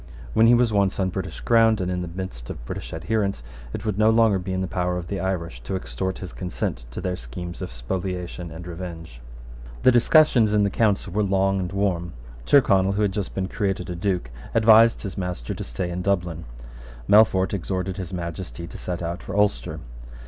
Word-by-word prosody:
When 115 +1 +5
he 120 - +7
was 120 -2 +2
once 100 -1 +2
on 95 -1 +1
British - - -5
ground, 115 -2 +4
and 90 -1 -1
in 90 0 -2
the 90 - -4
midst 85 -9 -7
of - - -7
British - - -6
adherents, 100 - -1 0.3
it 100 - -6
would 105 -2 -1
no 110 +1 +5
longer 110 -3 +4
be 95 +1 -5
in 95 0 -1
the 95 - -1
power 90 0 -1
of 85 -1 -6
the 100 - -2
Irish 85 -8 -3
to 95 - -4
extort 95 0 -3
his 95 - -8
consent 90 -9 -4
to - - -6
their 90 -1 -2
schemes 85 +7 -7
of - - -5
spoliation 90 +7 -4
and 80 +2 -9
revenge. 85 -7 -8 0.6
The 130 - +7
discussions 120 -3 +5
in 105 - +4
the 100 - +1
Council 100 -4 +1
were 105 - +1
long 95 -1 +2
and 90 -1 -3
warm. 95 -4 -1 0.3
Tyrconnel, 100 -8 +4
who 105 +2 +1
had 100 - +2
just 100 0 -4
been 95 -1 -1
created 95 -3 -2
a - - -4
Duke, 90 -8 -1 0.2
advised 115 0 +6
his 100 -2 -5
master 90 -10 -3
to - - -6
stay 75 +9 -4
in 90 +1 -3
Dublin. 90 -4 -1 0.6
Melfort 100 -3 +5
exhorted 95 0 -2
his 95 -2 -5
Majesty 85 -1 -5
to - - -10
set 90 -1 -4
out 85 +2 -4
for - - -5
Ulster. 100 -13 +1
95 Hz, 205 wpm, -24 LUFS, 85-100 Hz, 0.6 s, he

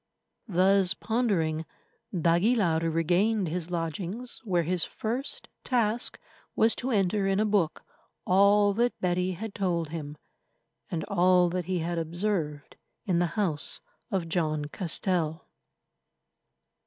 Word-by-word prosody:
Thus 190 0 +3
pondering, 190 -10 0 0.5
d'Aguilar 175 +1 +2
regained 180 +5 +1
his 175 +1 -3
lodgings, 180 +8 -4
where 180 -6 +1
his 175 +1 +2
first 240 +5 -4 0.2
task 235 -2 0 0.4
was 225 +1 +3
to 255 - -3
enter 200 -3 +1
in 195 0 +1
a 215 - +3
book 200 -7 +1 0.4
all 200 +2 +5
that 240 +4 0
Betty 180 +1 0
had 205 +4 -6
told 170 -5 -1
him, 150 -2 -6 0.7
and 160 -2 -2
all 180 -2 +3
that 180 0 -2
he 185 +1 -1
had 170 0 -1
observed 165 -3 -3 0.3
in 180 -5 +1
the 175 - +2
house 165 -8 0 0.3
of 185 -4 -1
John 155 -3 0
Castell. 165 0 -1
180 Hz, 120 wpm, -28 LUFS, 165-205 Hz, 0.7 s, all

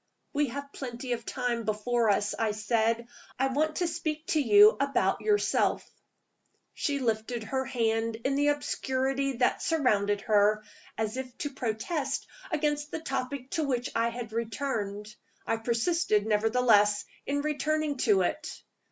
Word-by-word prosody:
"We 295 0 +2
have 280 +3 -7
plenty 250 -1 -6
of 230 -1 -6
time 245 -2 -1
before 225 +2 +1
us," 205 0 +2
I 220 -2 +1
said. 225 +2 0 0.3
"I 270 +1 +1
want 310 +3 0
to 355 - 0
speak 315 -1 -3
to 310 - +3
you 210 -3 +7
about 280 0 +1
yourself." 420 -1 +1 0.9
She 285 -1 -1
lifted 230 -2 -1
her 265 +4 -2
hand 225 -2 0
in 270 - +2
the 290 +1 +2
obscurity 270 -2 0
that 250 0 +1
surrounded 205 -10 +1
her, 210 +1 +3 0.3
as 220 +2 -2
if 255 -2 -6
to 290 - -3
protest 270 +4 -2 0.2
against 295 -2 -1
the 320 - -4
topic 270 -3 -4
to 320 - 0
which 250 -3 -1
I 230 +1 +2
had 230 -2 -7
returned. 220 -3 -3 0.3
I 225 - 0
persisted, 230 -1 +1
nevertheless, 210 -1 +3 0.2
in 285 +1 0
returning 305 -1 0
to 210 -6 +3
it. 300 - -4
245 Hz, 145 wpm, -29 LUFS, 220-285 Hz, 0.9 s, you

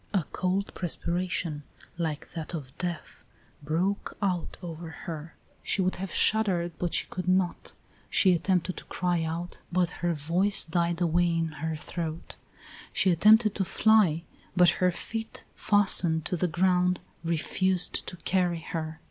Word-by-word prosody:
A 185 - +3
cold 185 +2 -1
perspiration, 175 -2 -2 0.3
like 160 -3 -4
that 165 +1 -5
of 135 -5 -8
death, 175 -3 -5 0.4
broke 175 +7 -1
out 185 -5 -2
over 165 -1 -6
her; 160 0 -8 0.3
she - - 0
would 185 - 0
have 190 -1 -5
shuddered, 190 -5 +2
but 175 -2 0
she - - +1
could 180 +1 -5
not; 185 -1 0 0.4
she 185 -2 +5
attempted 180 +1 0
to - - -7
cry 175 -2 -1
out, 165 +2 -4
but 180 -1 +1
her 175 -1 +1
voice 175 +7 +3
died 170 +1 -1
away 175 0 +2
in 165 -1 0
her 160 +1 -4
throat; 160 +1 -5 0.6
she 190 - +3
attempted 215 +5 +5
to 195 - -1
fly, 190 -4 +3 0.3
but 180 -1 +6
her 180 - +5
feet, 225 +5 -6
fastened 180 -6 +2
to 180 - 0
the 180 +1 0
ground, 180 +1 +2 0.2
refused 180 +2 +1
to 180 - -6
carry 175 0 0
her. 160 -1 -4
175 Hz, 150 wpm, -28 LUFS, 165-185 Hz, 0.6 s, but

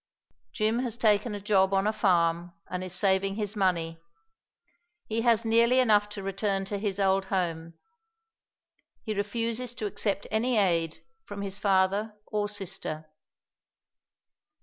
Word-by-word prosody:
Jim 220 - 0
has 240 -3 -3
taken 210 -1 +2
a - - -5
job 195 -1 +2
on 195 +1 +2
a 215 - +1
farm 175 -4 +1 0.2
and 180 0 -3
is 185 - -6
saving 190 +1 +1
his 210 0 -3
money. 170 -4 0 1.0
He 225 +1 -1
has 230 -1 +3
nearly 235 +3 +4
enough 210 -4 +4
to 210 -1 -7
return 195 0 -1
to 200 +1 -4
his 200 -1 -2
old 195 0 +2
home; 165 -4 -2 1.3
he 215 - -2
refuses 230 +4 -2
to 215 - -4
accept 200 0 -1
any 230 +3 +1
aid 165 -5 +1 0.2
from 200 -1 -7
his 200 0 -3
father 200 +2 +1
or 210 -1 -2
sister. 160 -6 -6
200 Hz, 140 wpm, -28 LUFS, 190-215 Hz, 1.3 s, nearly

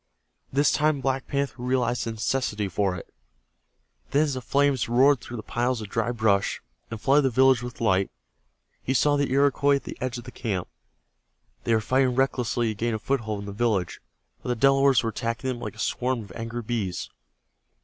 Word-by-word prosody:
This 140 +2 +3
time 150 -1 +2
Black 135 0 -1
Panther 140 -3 -2
realized 125 -1 0
the 115 - -3
necessity 105 -2 -1
for 95 0 0
it. 85 - -10 1.0
Then 145 +2 +3
as 145 -3 -1
the 130 - -4
flames 140 -2 +1
roared 130 +2 +4
through 120 - -7
the 110 - -6
piles 120 +1 -1
of 105 -3 -7
dry 115 +2 0
brush, 110 -4 +1 0.3
and 115 - -6
flooded 140 +6 +4
the - - +3
village 130 0 +4
with 125 -1 -7
light, 95 -4 +2 0.7
he 130 - -1
saw 145 +3 +3
the 140 -2 0
Iroquois 140 +1 +3
at 140 - -3
the - - -8
edge 125 -1 -2
of 120 - -8
the 125 - -10
camp. 100 -9 -3 1.0
They 115 - +3
were 110 - +1
fighting 130 +2 +2
recklessly 125 -3 +1
to - - -2
gain 115 +2 -1
a - - -1
foothold 110 -3 -2
in - - -7
the 100 - -6
village, 105 -5 -1 0.4
but - - -6
the 125 - +1
Delawares 135 0 +4
were 115 - -1
attacking 115 +3 -3
them 125 -2 -3
like - - -6
a - - -18
swarm 125 -1 -1
of 100 - -13
angry 115 +2 -5
bees. 105 -5 -3
120 Hz, 200 wpm, -25 LUFS, 110-135 Hz, 1.0 s, roared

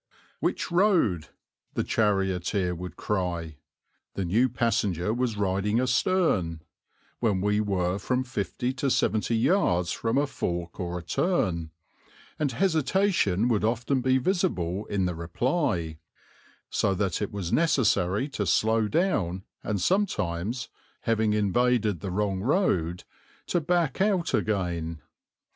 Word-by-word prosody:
"Which - - -1
road?" 170 - +3 0.5
the - - +1
charioteer 95 -3 0
would 90 +1 -7
cry 85 -6 -2 0.6
the 95 - -2
new 115 +9 +3
passenger 105 -5 0
was 120 -3 -1
riding 100 +3 +1
astern 125 - +1 0.6
when 105 -5 +1
we 105 +2 +1
were 95 -2 0
from 125 +5 0
fifty 125 +1 -3
to 135 +1 -1
seventy 115 -1 +1
yards 110 - +2
from 115 +2 -1
a 145 - +3
fork 85 -10 -4
or 90 -1 -3
a 85 - -7
turn, 85 - 0 0.7
and 145 -3 +1
hesitation 160 - +2
would 110 -4 +1
often 120 +4 +1
be 130 +1 +3
visible 110 - -1
in 100 -2 0
the 90 - -1
reply, 85 - -1 0.7
so 95 - +1
that 95 0 -1
it 105 - -2
was 95 -4 -4
necessary 110 - +2
to 105 -8 -3
slow 110 +5 +2
down 105 - 0 0.2
and 105 -2 -1
sometimes, 110 - 0 0.3
having 110 -2 +1
invaded 105 -1 +2
the 95 - -5
wrong 95 0 -1
road, 95 - +1 0.4
to 175 - 0
back 170 -1 0
out 195 -4 +1
again. 85 -6 -1
105 Hz, 125 wpm, -27 LUFS, 90-130 Hz, 0.7 s, road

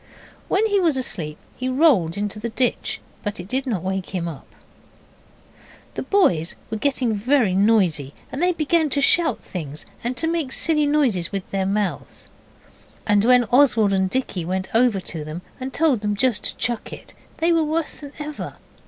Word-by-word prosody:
When 405 +3 +2
he 405 -2 +2
was 330 -7 +2
asleep 170 -12 -3 0.2
he 255 0 -3
rolled 255 - +3
into 205 +1 -3
the 235 +2 -3
ditch, 245 +2 -1 0.2
but 205 -2 -4
it 175 - -7
did 265 +5 -2
not 210 -8 -1
wake 190 0 -3
him 170 -2 -1
up. 155 -5 -8 1.5
The - - -4
boys 180 - +2 0.2
were 220 - -1
getting 260 -2 0
very 225 -1 +2
noisy, 185 -9 +2 0.2
and 265 +5 -4
they 360 +1 +4
began 320 -1 +1
to 285 - +1
shout 325 +4 +3
things, 155 -5 -6 0.2
and 245 +2 -2
to 325 - 0
make 325 -5 -1
silly 300 -2 +2
noises 250 - +1
with 195 -2 -4
their 195 -1 0
mouths, 200 0 -3 0.8
and 205 -1 +3
when 250 +1 +5
Oswald 240 -6 +4
and 190 -1 +1
Dicky 200 -6 -2
went 185 +2 -3
over 230 -3 +3
to 165 -3 -5
them 155 +4 -7 0.2
and 260 +1 -5
told 285 -8 +2
them 210 -1 -1
to - - -14
just 245 -5 0
chuck 240 -2 -2
it, - - -10 0.2
they 335 +1 +2
were 330 -1 +3
worse 315 +1 -2
than 285 -2 -9
ever. 300 0 -6
230 Hz, 180 wpm, -22 LUFS, 190-290 Hz, 1.5 s, when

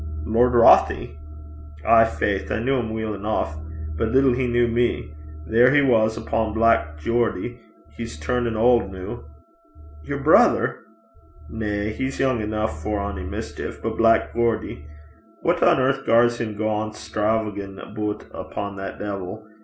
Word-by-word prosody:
'Lord 120 +5 +2
Rothie?' 115 -9 +5 0.7
'Ay, 115 0 +6
faith. 100 -3 -1
I - - +1
kent 115 +2 -3
him 120 -5 0
weel 110 -1 -3
eneuch, 105 -4 -2 0.5
but 115 - +1
little 130 +1 +4
he 125 -1 -1
kent 120 -1 +2
me. 120 -10 0 0.3
There 115 +7 +4
he 145 - +6
was 110 -4 +2
upo' 110 -1 -1
Black 110 -10 +2
Geordie. 115 +4 -1 0.4
He's 115 -10 -7
turnin' 115 +7 -1
auld 115 -3 +3
noo.' 95 +5 -8 0.8
'Yer 75 - -4
brither?' - - +4 0.7
'Na. 105 0 -2
He's 130 +3 -4
young 130 -4 +1
eneuch 110 +1 -2
for 105 +3 -2
ony 100 -2 -4
mischeef; - - -6
but - - -3
Black 115 0 +3
Geordie. 115 -10 -1 0.6
What - - +1
on - - +4
earth 135 +1 +1
gars 120 +1 +4
him 110 -3 -4
gang 110 0 -2
stravaguin' 105 -3 -2
aboot 105 -1 -4
upo' 100 0 -6
that 95 0 -6
deevil? 100 +1 -6
110 Hz, 145 wpm, -23 LUFS, 105-120 Hz, 0.8 s, Ay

